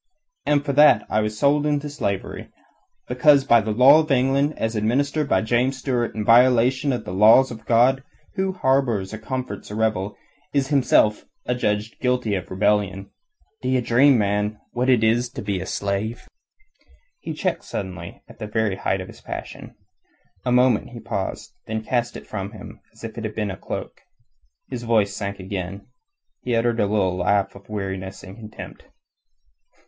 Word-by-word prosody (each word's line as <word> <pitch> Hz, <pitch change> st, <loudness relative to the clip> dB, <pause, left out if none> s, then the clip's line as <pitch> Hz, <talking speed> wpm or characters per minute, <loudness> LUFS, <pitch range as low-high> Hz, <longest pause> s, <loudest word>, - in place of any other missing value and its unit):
And 145 Hz, -1 st, +2 dB
for 140 Hz, -, -1 dB
that 150 Hz, +2 st, +6 dB
I 110 Hz, -, +2 dB
was 105 Hz, 0 st, -3 dB
sold 145 Hz, +4 st, +2 dB
into 145 Hz, 0 st, -1 dB
slavery: 100 Hz, -10 st, -4 dB, 0.6 s
because 140 Hz, +3 st, +4 dB
by 120 Hz, -4 st, +5 dB
the 110 Hz, -, -5 dB
law 130 Hz, +8 st, +7 dB
of 155 Hz, 0 st, -1 dB
England, 135 Hz, +2 st, +2 dB
as 110 Hz, 0 st, -2 dB
administered 140 Hz, +7 st, 0 dB
by 95 Hz, 0 st, +2 dB
James 125 Hz, +4 st, +1 dB
Stuart 125 Hz, -3 st, -2 dB
in 105 Hz, -1 st, -3 dB
violation 125 Hz, +4 st, +4 dB
of 125 Hz, -, -3 dB
the 90 Hz, -, -6 dB
laws 110 Hz, +7 st, +6 dB
of 110 Hz, -2 st, -10 dB
God, 125 Hz, +3 st, +3 dB, 0.3 s
who 190 Hz, -1 st, -1 dB
harbours 130 Hz, -, 0 dB
or 110 Hz, -, -6 dB
comforts 125 Hz, -3 st, -5 dB
a 105 Hz, -, -6 dB
rebel 105 Hz, -2 st, -1 dB, 0.4 s
is 135 Hz, -1 st, +1 dB
himself 125 Hz, -6 st, +3 dB, 0.2 s
adjudged 110 Hz, -3 st, -2 dB
guilty 125 Hz, -4 st, 0 dB
of 95 Hz, -, -3 dB
rebellion. 100 Hz, 0 st, 0 dB, 0.5 s
D'ye 130 Hz, 0 st, +1 dB
dream 125 Hz, +3 st, +4 dB
man, 105 Hz, 0 st, 0 dB
what 125 Hz, +2 st, -1 dB
it 120 Hz, -4 st, +4 dB
is 120 Hz, +2 st, +2 dB
to -, -, -6 dB
be 100 Hz, -2 st, -2 dB
a 95 Hz, -, -6 dB
slave?" 100 Hz, +3 st, -3 dB, 0.9 s
He -, -, -6 dB
checked -, -, -2 dB
suddenly 90 Hz, -4 st, -7 dB
at -, -, -16 dB
the 105 Hz, -, -5 dB
very 105 Hz, -2 st, -1 dB
height 95 Hz, 0 st, -1 dB
of 95 Hz, -, -8 dB
his -, -, -14 dB
passion. -, -, -8 dB, 0.7 s
A 125 Hz, -, -1 dB
moment 125 Hz, -2 st, +3 dB
he 120 Hz, -1 st, -10 dB
paused, 110 Hz, -4 st, -5 dB
then 110 Hz, 0 st, -3 dB
cast 120 Hz, +1 st, -1 dB
it -, -, -11 dB
from 100 Hz, 0 st, -6 dB
him 110 Hz, -, -11 dB
as -, -, -19 dB
if 115 Hz, 0 st, -6 dB
it -, -, -6 dB
had 110 Hz, -1 st, -5 dB
been 105 Hz, -2 st, -2 dB
a -, -, -6 dB
cloak. -, -, -7 dB, 0.7 s
His 125 Hz, -3 st, -6 dB
voice 110 Hz, -4 st, +1 dB
sank 100 Hz, -1 st, -5 dB
again. 95 Hz, +1 st, -6 dB, 0.6 s
He 125 Hz, -2 st, -1 dB
uttered 115 Hz, 0 st, +1 dB
a 105 Hz, -, +2 dB
little 100 Hz, -3 st, +1 dB
laugh 100 Hz, +2 st, +1 dB
of 100 Hz, +1 st, -16 dB
weariness 95 Hz, -2 st, -5 dB
and 95 Hz, 0 st, -10 dB
contempt. 110 Hz, -1 st, -11 dB
115 Hz, 175 wpm, -22 LUFS, 100-130 Hz, 0.9 s, law